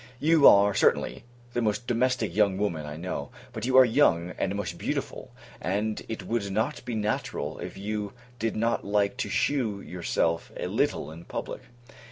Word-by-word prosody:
You 160 Hz, -1 st, +6 dB
are, 100 Hz, 0 st, +7 dB
certainly, -, -, +1 dB, 0.3 s
the 120 Hz, -, 0 dB
most 110 Hz, +2 st, 0 dB
domestic 120 Hz, -5 st, 0 dB
young 100 Hz, -3 st, +3 dB
woman 85 Hz, -7 st, -2 dB
I 75 Hz, +1 st, -6 dB
know: 80 Hz, -5 st, -4 dB, 0.2 s
but 110 Hz, +2 st, -4 dB
you 130 Hz, 0 st, +4 dB
are 130 Hz, -, +10 dB
young, 90 Hz, -, +3 dB
and 95 Hz, +1 st, 0 dB
most 100 Hz, -3 st, -4 dB
beautiful; -, -, -4 dB, 0.3 s
and 105 Hz, +3 st, -1 dB
it 110 Hz, -3 st, -4 dB
would 110 Hz, -1 st, -1 dB
not 110 Hz, +9 st, -1 dB
be 120 Hz, -, -3 dB
natural, 105 Hz, -1 st, -2 dB
if -, -, -7 dB
you 105 Hz, 0 st, -3 dB, 0.3 s
did 115 Hz, -1 st, -1 dB
not 115 Hz, +2 st, 0 dB
like 100 Hz, +1 st, +1 dB
to -, -, -2 dB
shew 115 Hz, -8 st, 0 dB
yourself 85 Hz, -3 st, -1 dB
a -, -, -3 dB
little -, -, 0 dB
in 85 Hz, +2 st, -11 dB
public. -, -, -5 dB
105 Hz, 175 wpm, -27 LUFS, 95-115 Hz, 0.3 s, are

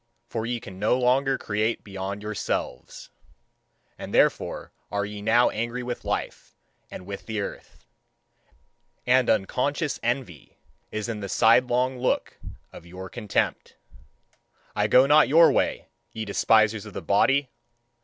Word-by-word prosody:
For 115 Hz, -1 st, -4 dB
ye 120 Hz, 0 st, -2 dB
can 95 Hz, -4 st, -11 dB
no 110 Hz, +4 st, +2 dB
longer 130 Hz, +2 st, +2 dB
create 110 Hz, +2 st, -2 dB
beyond 100 Hz, 0 st, -6 dB
yourselves. 105 Hz, -1 st, -4 dB, 0.9 s
And -, -, -7 dB
therefore -, -, +1 dB, 0.2 s
are 100 Hz, 0 st, -1 dB
ye 105 Hz, 0 st, -7 dB
now 115 Hz, +3 st, +3 dB
angry 120 Hz, +3 st, -3 dB
with 120 Hz, 0 st, -5 dB
life -, -, -4 dB, 0.3 s
and 90 Hz, -, -9 dB
with 100 Hz, +1 st, -8 dB
the 110 Hz, -2 st, -3 dB
earth. 100 Hz, -, -8 dB, 1.2 s
And 125 Hz, 0 st, +3 dB
unconscious 140 Hz, -, 0 dB
envy 120 Hz, -, -4 dB, 0.3 s
is 110 Hz, 0 st, -4 dB
in 115 Hz, -2 st, -4 dB
the 100 Hz, -1 st, -6 dB
sidelong 125 Hz, +4 st, +3 dB
look 125 Hz, -, -1 dB, 0.3 s
of -, -, -11 dB
your 95 Hz, +2 st, -9 dB
contempt. 105 Hz, -5 st, -2 dB, 1.0 s
I -, -, +1 dB
go 130 Hz, +1 st, +6 dB
not 150 Hz, +2 st, +5 dB
your 165 Hz, +3 st, +7 dB
way, -, -, -1 dB, 0.2 s
ye 110 Hz, -1 st, -5 dB
despisers 110 Hz, +1 st, +2 dB
of 105 Hz, -, -11 dB
the -, -, -5 dB
body! 135 Hz, +7 st, +2 dB
115 Hz, 135 wpm, -25 LUFS, 105-125 Hz, 1.2 s, your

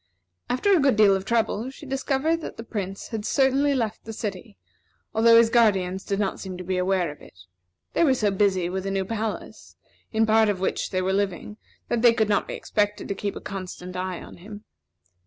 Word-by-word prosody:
After 380 Hz, +11 st, +3 dB
a -, -, +4 dB
good 275 Hz, -4 st, +3 dB
deal 205 Hz, -2 st, +5 dB
of 190 Hz, 0 st, -4 dB
trouble, 230 Hz, +1 st, 0 dB
she 270 Hz, +3 st, -12 dB
discovered 270 Hz, +4 st, 0 dB
that -, -, -7 dB
the 230 Hz, -, -6 dB
Prince 195 Hz, -4 st, -5 dB
had 225 Hz, -3 st, -4 dB
certainly 275 Hz, +4 st, +2 dB
left 225 Hz, -5 st, -2 dB
the 225 Hz, -, -7 dB
city, 195 Hz, -, -6 dB, 0.6 s
although 230 Hz, +1 st, +6 dB
his 230 Hz, -1 st, +5 dB
guardians 190 Hz, -5 st, +2 dB
did 200 Hz, 0 st, -2 dB
not 195 Hz, -2 st, -1 dB
seem 185 Hz, -2 st, -6 dB
to 180 Hz, -, -7 dB
be 185 Hz, 0 st, -1 dB
aware 180 Hz, -3 st, +1 dB
of 145 Hz, -, -14 dB
it. 90 Hz, -, -16 dB, 0.5 s
They -, -, +3 dB
were 270 Hz, -5 st, +4 dB
so 210 Hz, -4 st, +1 dB
busy 190 Hz, -3 st, +1 dB
with 190 Hz, +2 st, -3 dB
a -, -, 0 dB
new 195 Hz, -1 st, -1 dB
palace, 220 Hz, +1 st, -5 dB, 0.4 s
in 220 Hz, 0 st, +2 dB
part 220 Hz, 0 st, +4 dB
of 200 Hz, -3 st, -1 dB
which 190 Hz, -, -1 dB
they 185 Hz, -1 st, -1 dB
were 190 Hz, +1 st, 0 dB
living, 200 Hz, +1 st, -2 dB, 0.3 s
that 235 Hz, -, 0 dB
they 235 Hz, -1 st, +6 dB
could 220 Hz, -2 st, +1 dB
not 205 Hz, -, +1 dB
be -, -, -5 dB
expected 205 Hz, 0 st, -1 dB
to -, -, 0 dB
keep 200 Hz, +1 st, -4 dB
a -, -, -5 dB
constant 185 Hz, -2 st, -7 dB
eye 185 Hz, 0 st, -3 dB
upon -, -, -11 dB
him. 205 Hz, +4 st, -11 dB
210 Hz, 215 wpm, -25 LUFS, 190-230 Hz, 0.6 s, although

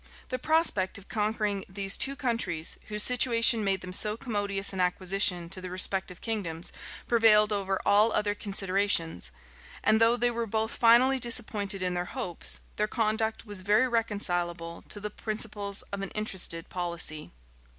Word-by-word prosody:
The 255 Hz, -, -3 dB
prospect 310 Hz, -, +1 dB
of 200 Hz, -, -14 dB
conquering 210 Hz, -2 st, -2 dB
these 195 Hz, +1 st, -1 dB
two 275 Hz, +1 st, +1 dB
countries, 230 Hz, -, -1 dB
whose 210 Hz, -1 st, 0 dB
situation 235 Hz, -2 st, +4 dB
made 195 Hz, -2 st, 0 dB
them 180 Hz, 0 st, -8 dB
so 210 Hz, +3 st, 0 dB
commodious 205 Hz, -5 st, 0 dB
an 190 Hz, -, -5 dB
acquisition 180 Hz, -1 st, +2 dB
to 185 Hz, 0 st, -2 dB
the 185 Hz, -, -7 dB
respective 185 Hz, 0 st, -1 dB
kingdoms, 180 Hz, -8 st, -4 dB, 0.3 s
prevailed 215 Hz, -2 st, +5 dB
over 195 Hz, -1 st, -1 dB
all 210 Hz, +3 st, +4 dB
other 210 Hz, -1 st, 0 dB
considerations; 195 Hz, -, 0 dB, 0.5 s
and 220 Hz, +1 st, +3 dB
though 230 Hz, +1 st, +4 dB
they 245 Hz, 0 st, +1 dB
were 235 Hz, -1 st, -3 dB
both 220 Hz, +1 st, -2 dB
finally 250 Hz, +3 st, +4 dB
disappointed 215 Hz, -5 st, +2 dB
in 180 Hz, -1 st, -1 dB
their 175 Hz, 0 st, -2 dB
hopes, 175 Hz, -2 st, -4 dB, 0.2 s
their 210 Hz, -, +1 dB
conduct 220 Hz, 0 st, -1 dB
was 205 Hz, -3 st, -7 dB
very 210 Hz, +6 st, +2 dB
reconcilable 175 Hz, -7 st, -1 dB
to 205 Hz, -, -6 dB
the 210 Hz, +1 st, -6 dB
principles 210 Hz, -2 st, -3 dB
of 200 Hz, -, -3 dB
an 195 Hz, -, -4 dB
interested 190 Hz, -6 st, -3 dB
policy. 170 Hz, -4 st, -2 dB
205 Hz, 155 wpm, -28 LUFS, 185-225 Hz, 0.5 s, prevailed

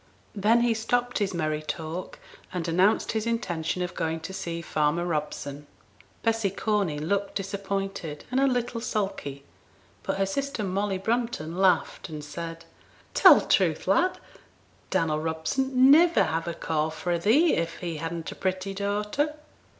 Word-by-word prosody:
Then 220 Hz, +3 st, +3 dB
he 240 Hz, -1 st, +3 dB
stopped 245 Hz, +2 st, 0 dB
his 200 Hz, -2 st, 0 dB
merry 155 Hz, -3 st, -1 dB
talk, 160 Hz, +3 st, -5 dB, 0.3 s
and 180 Hz, -2 st, -3 dB
announced 185 Hz, +6 st, +3 dB
his 220 Hz, 0 st, -2 dB
intention 180 Hz, -6 st, -1 dB
of 180 Hz, -, -4 dB
going 160 Hz, 0 st, -2 dB
to 190 Hz, -, -7 dB
see 170 Hz, -3 st, -4 dB
farmer 155 Hz, +1 st, 0 dB
Robson. 150 Hz, -3 st, -3 dB, 0.6 s
Bessy 225 Hz, -3 st, +2 dB
Corney 195 Hz, -5 st, 0 dB
looked 195 Hz, +6 st, -1 dB
disappointed 195 Hz, -5 st, -4 dB
and 255 Hz, -, +2 dB
a 275 Hz, -, +4 dB
little 245 Hz, -2 st, -1 dB
sulky; 195 Hz, -, -3 dB, 0.6 s
but -, -, -2 dB
her 195 Hz, -, +2 dB
sister 275 Hz, +3 st, -2 dB
Molly 195 Hz, +1 st, -1 dB
Brunton 225 Hz, -6 st, -2 dB
laughed, 185 Hz, -1 st, +2 dB
and 155 Hz, -1 st, -6 dB
said, 165 Hz, +2 st, -7 dB, 0.5 s
'Tell -, -, +8 dB
truth, -, -, +1 dB
lad! 365 Hz, +2 st, +3 dB, 0.7 s
Dannel 160 Hz, -4 st, 0 dB
Robson 160 Hz, +12 st, -1 dB
'd 265 Hz, -, -9 dB, 0.2 s
niver 335 Hz, +3 st, +6 dB
have 165 Hz, +1 st, -2 dB
a 170 Hz, -, -3 dB
call 155 Hz, -2 st, -1 dB
fra' 170 Hz, +2 st, -2 dB
thee 280 Hz, -, +4 dB
if 165 Hz, 0 st, -1 dB
he 170 Hz, -3 st, -4 dB
hadn't 165 Hz, +1 st, -4 dB
a -, -, -8 dB
pretty 185 Hz, +1 st, -2 dB
daughter.' 210 Hz, +9 st, -1 dB
190 Hz, 150 wpm, -27 LUFS, 165-220 Hz, 0.7 s, Tell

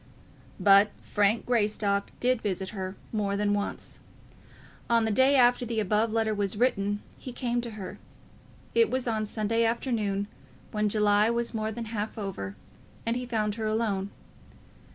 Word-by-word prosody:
But 200 Hz, +1 st, +6 dB
Frank 205 Hz, +2 st, +1 dB
Greystock 210 Hz, -4 st, +1 dB
did 250 Hz, -1 st, +2 dB
visit 190 Hz, -2 st, -2 dB
her, 190 Hz, -2 st, -5 dB, 0.2 s
more 200 Hz, -2 st, 0 dB
than 205 Hz, 0 st, +1 dB
once. 205 Hz, 0 st, -3 dB, 0.9 s
On 230 Hz, -1 st, +4 dB
the 220 Hz, -, +1 dB
day 260 Hz, +6 st, +5 dB
after 245 Hz, -1 st, +5 dB
the 230 Hz, -2 st, -2 dB
above 215 Hz, +2 st, +1 dB
letter 220 Hz, -1 st, +1 dB
was 205 Hz, -1 st, -1 dB
written 205 Hz, -4 st, +1 dB, 0.2 s
he 255 Hz, -, -7 dB
came 240 Hz, -1 st, -1 dB
to 235 Hz, -1 st, -6 dB
her. 190 Hz, -3 st, -7 dB, 0.7 s
It 460 Hz, -1 st, +4 dB
was 255 Hz, -1 st, -1 dB
on 215 Hz, -2 st, 0 dB
Sunday 225 Hz, +2 st, +1 dB
afternoon, 225 Hz, -4 st, 0 dB, 0.5 s
when 210 Hz, -1 st, +1 dB
July 210 Hz, 0 st, +3 dB
was 235 Hz, 0 st, -1 dB
more 220 Hz, -1 st, -1 dB
than 230 Hz, +1 st, -5 dB
half 215 Hz, 0 st, -4 dB
over, 180 Hz, -, -5 dB, 0.5 s
and 230 Hz, +1 st, 0 dB
he 250 Hz, 0 st, -3 dB
found 215 Hz, -3 st, 0 dB
her 220 Hz, -, 0 dB
alone. 215 Hz, -3 st, 0 dB
215 Hz, 155 wpm, -28 LUFS, 205-235 Hz, 0.9 s, But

